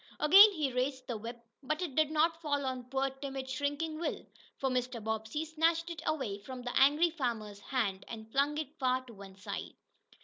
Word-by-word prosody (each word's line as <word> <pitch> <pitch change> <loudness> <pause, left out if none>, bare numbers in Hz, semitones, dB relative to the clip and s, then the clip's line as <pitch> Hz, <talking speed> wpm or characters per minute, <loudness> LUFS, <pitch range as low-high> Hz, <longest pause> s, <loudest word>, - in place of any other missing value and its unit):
Again 390 +8 +9
he 295 -7 -1
raised 260 +1 -1
the 240 - -3
whip, 230 +2 -7 0.2
but 305 +3 -2
it 325 -7 -4
did 310 +2 +3
not 325 +2 +2
fall 285 -3 -1
on 255 -1 -3
poor, 270 +1 -1
timid, 270 0 -6
shrinking 290 +4 -2
Will. 340 - -3 0.3
For 270 - -1
Mr. 250 -2 -1
Bobbsey 220 +7 -3
snatched 325 +2 +1
it 325 -3 -6
away 255 -10 -1
from 250 +4 -8
the 245 - -4
angry 295 +5 +5
farmer's 230 -9 -3
hand 205 -5 -1
and 220 -1 -8
flung 285 +3 +1
it 310 0 -5
far 255 -1 +1
to 240 - -12
one 195 -2 -12
side. 200 +1 -6
265 Hz, 195 wpm, -32 LUFS, 240-305 Hz, 0.3 s, Again